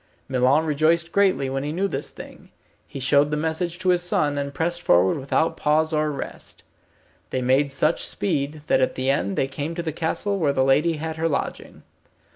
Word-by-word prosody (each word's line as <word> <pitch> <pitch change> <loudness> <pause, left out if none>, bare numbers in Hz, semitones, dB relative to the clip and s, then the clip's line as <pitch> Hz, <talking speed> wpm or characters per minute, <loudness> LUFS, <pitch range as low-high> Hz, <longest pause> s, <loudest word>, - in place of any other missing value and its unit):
Milon 130 +4 +2
rejoiced 160 +3 +1
greatly 195 -9 +2
when 135 +1 -2
he 145 +2 -3
knew 190 +5 0
this 140 -6 -3
thing. - - -12 0.4
He 140 - -8
showed 140 +3 +3
the 150 - -1
message 160 +2 -2
to 185 0 -1
his 180 -1 +3
son, 150 -4 0
and 140 0 -3
pressed 170 +4 -2
forward 95 - +3
without 140 +4 0
pause 155 +2 +1
or 155 0 +1
rest. 140 - -8 0.7
They 130 - -2
made 135 +3 +2
such 150 +4 0
speed, 150 -4 -2
that - - +2
at 130 - +1
the 130 +1 +1
end 100 -9 -1
they 135 - +1
came 145 +4 -5
to 170 - -3
the 160 -2 -3
castle 195 +5 -2
where 145 -5 +1
the 130 - +2
lady 150 +5 +3
had 160 +1 -5
her 165 +1 0
lodging. 140 - -4
150 Hz, 200 wpm, -23 LUFS, 140-165 Hz, 0.7 s, showed